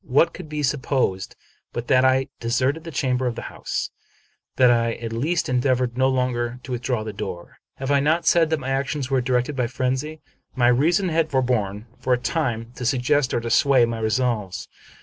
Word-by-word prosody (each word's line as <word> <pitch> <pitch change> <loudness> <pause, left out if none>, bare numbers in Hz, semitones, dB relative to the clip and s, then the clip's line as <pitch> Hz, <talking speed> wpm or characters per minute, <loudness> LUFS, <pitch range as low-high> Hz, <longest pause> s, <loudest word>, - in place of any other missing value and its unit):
What 165 +6 +3
could 155 - -9
be 150 -1 -3
supposed 130 -8 -1 0.4
but 120 - -4
that 130 -1 +4
I 130 0 +3
de 115 - -5
serted 130 +6 +1
the - - -5
chamber 130 -5 0
and 120 - -2
the - - -6
house? - - -3 0.6
that 125 -1 +5
I 115 -1 +2
at 115 -1 -6
least 155 +9 0
endeavored 125 -1 +1
no 130 +1 +3
longer 125 -2 -1
to 130 - -8
withdraw 120 -2 -1
the 110 -1 -6
door? 95 -4 -7 0.2
Have 135 +1 -3
I 140 - +4
not 155 +4 +1
said 165 -2 +4
that 160 -1 0
my 135 0 -5
actions 135 0 -2
were 135 -1 +3
dictated 125 +3 0
by 125 -2 0
frenzy? 130 +5 -2 0.4
My 120 -1 +4
reason 170 +10 +2
had 160 -1 +1
forborne, 115 -6 0
for 130 0 +1
a - - +3
time, 120 -3 -2
to - - -5
suggest 130 +2 +1
or - - 0
to 115 0 -4
sway 130 0 +5
my 115 -1 -4
resolves. 110 -4 -1
130 Hz, 200 wpm, -23 LUFS, 120-140 Hz, 0.6 s, that